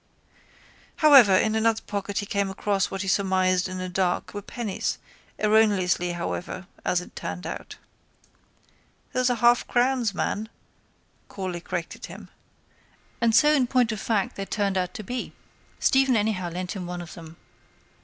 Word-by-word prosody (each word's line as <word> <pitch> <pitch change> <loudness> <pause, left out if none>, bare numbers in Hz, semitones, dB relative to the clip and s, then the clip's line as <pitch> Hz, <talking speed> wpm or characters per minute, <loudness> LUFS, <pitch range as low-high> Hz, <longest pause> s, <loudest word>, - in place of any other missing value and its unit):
However 270 -11 +7
in 215 +3 +2
another 220 0 +1
pocket 200 -1 -4
he 205 - 0
came 200 -1 -1
across 195 0 0
what 195 +1 -4
he - - -5
surmised 185 -1 +2
in 185 - -5
the 185 0 -4
dark 180 0 -1
were 205 - -5
pennies, 210 -1 -3 0.4
erroneously 200 -5 +2
however, 175 +2 -4 0.2
as 180 - +1
it - - -13
turned 180 - -5
out. - - -6 1.4
—Those 255 0 +2
are 245 - 0
halfcrowns, 240 -1 +2
man, 215 +3 -2 0.8
Corley 185 -3 -5
corrected 170 0 -5
him. - - -11 0.9
And 230 -1 +3
so 300 +3 +6
in 265 -4 +3
point 245 -2 +2
of 215 -1 -4
fact 210 -4 -1
they 195 - -3
turned 200 -1 -1
out 180 -1 -1
to 215 - -6
be. 245 +5 -5 0.5
Stephen 270 -2 +3
anyhow 205 -4 0
lent 180 +1 -5
him 180 -3 -5
one 175 0 -5
of 170 - -11
them. 165 -1 -11
200 Hz, 155 wpm, -25 LUFS, 185-225 Hz, 1.4 s, However